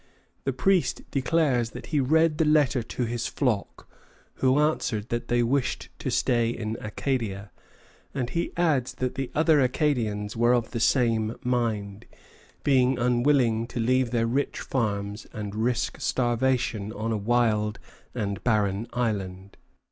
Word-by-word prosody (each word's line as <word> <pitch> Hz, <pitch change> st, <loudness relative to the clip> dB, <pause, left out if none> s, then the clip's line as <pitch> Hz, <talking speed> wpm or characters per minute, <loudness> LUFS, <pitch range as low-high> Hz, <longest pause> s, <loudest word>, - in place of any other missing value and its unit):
The 135 Hz, -, +1 dB
priest 180 Hz, +8 st, +1 dB
declares 135 Hz, -4 st, +1 dB
that -, -, -9 dB
he 150 Hz, -, +3 dB
read 155 Hz, +3 st, +3 dB
the -, -, +5 dB
letter 150 Hz, -4 st, +3 dB
to 120 Hz, +2 st, -3 dB
his 120 Hz, 0 st, -2 dB
flock, 120 Hz, -8 st, -2 dB, 0.5 s
who 130 Hz, +1 st, +3 dB
answered 130 Hz, -8 st, 0 dB
that 120 Hz, 0 st, -2 dB
they 120 Hz, 0 st, +2 dB
wished 130 Hz, +2 st, -1 dB
to -, -, -3 dB
stay 120 Hz, -2 st, +2 dB
in 110 Hz, -2 st, -3 dB
Acadia; 105 Hz, -3 st, -3 dB, 0.6 s
and 125 Hz, -3 st, -3 dB
he 170 Hz, -, -1 dB
adds 150 Hz, -8 st, +1 dB
that 125 Hz, -1 st, -2 dB
the 135 Hz, -2 st, -3 dB
other 155 Hz, -1 st, +4 dB
Acadians 120 Hz, -7 st, 0 dB
were 120 Hz, +2 st, +3 dB
of 120 Hz, -2 st, -1 dB
the 115 Hz, -, -3 dB
same 115 Hz, -2 st, +2 dB
mind, 110 Hz, -4 st, -2 dB, 0.6 s
being 130 Hz, -2 st, +3 dB
unwilling 120 Hz, -2 st, +2 dB
to 120 Hz, -, -5 dB
leave 130 Hz, +2 st, +2 dB
their 115 Hz, -1 st, +1 dB
rich 135 Hz, +5 st, -1 dB
farms 105 Hz, -4 st, -2 dB
and 105 Hz, -3 st, -5 dB
risk 115 Hz, +3 st, -1 dB
starvation 120 Hz, -4 st, 0 dB
on 110 Hz, +2 st, -3 dB
a -, -, +1 dB
wild 105 Hz, -1 st, +1 dB, 0.4 s
and 100 Hz, -4 st, -3 dB
barren 105 Hz, -2 st, +1 dB
island. 100 Hz, -5 st, -3 dB
120 Hz, 145 wpm, -26 LUFS, 110-130 Hz, 0.6 s, the